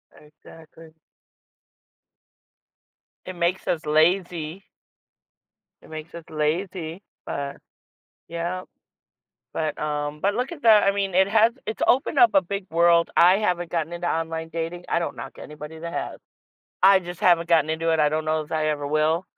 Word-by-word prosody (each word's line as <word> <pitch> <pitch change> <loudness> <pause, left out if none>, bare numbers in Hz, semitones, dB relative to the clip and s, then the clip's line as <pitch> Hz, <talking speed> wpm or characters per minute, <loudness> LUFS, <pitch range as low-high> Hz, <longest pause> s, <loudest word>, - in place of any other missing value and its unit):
Exactly. 160 +1 -16 2.3
It 185 - -6
makes 175 +2 -1
us 165 -2 -1
lazy. 170 +2 +1 1.1
It - - -17
makes 155 +1 -8
us 170 - -8
lazy, 165 +3 -2 0.2
but, 140 0 -4 0.7
yeah, 170 +2 -3 0.9
but 155 -2 -3
um, 150 0 -3
but 200 +4 +1
look 250 +6 -2
at 305 -4 -10
that, 220 -2 +7
I 195 - +4
mean, 195 -2 -2
it 190 +1 +4
has 225 +2 +4
it's 220 - -4
opened 270 +3 +2
up 240 -2 +7
a 195 - +5
big 200 +2 -5
world. 170 0 +4
I 180 +2 +6
haven't 175 -5 -1
gotten 165 -1 -2
into 175 0 -4
online 160 0 -2
dating, 165 +2 -4
I - - +1
don't 170 - -4
knock - - -8
anybody 150 +1 -9
that 170 +1 -6
has, - - -4 0.6
I 195 +1 +7
just 175 -1 -9
haven't 170 -2 +3
gotten 160 -2 +3
into 165 +1 -1
it, 160 - +1
I 150 - +4
don't 155 +1 -2
know 155 0 0
if 150 - -12
I 155 -1 0
ever 145 -1 -2
will. 155 +4 +1
170 Hz, 160 wpm, -24 LUFS, 155-185 Hz, 2.3 s, that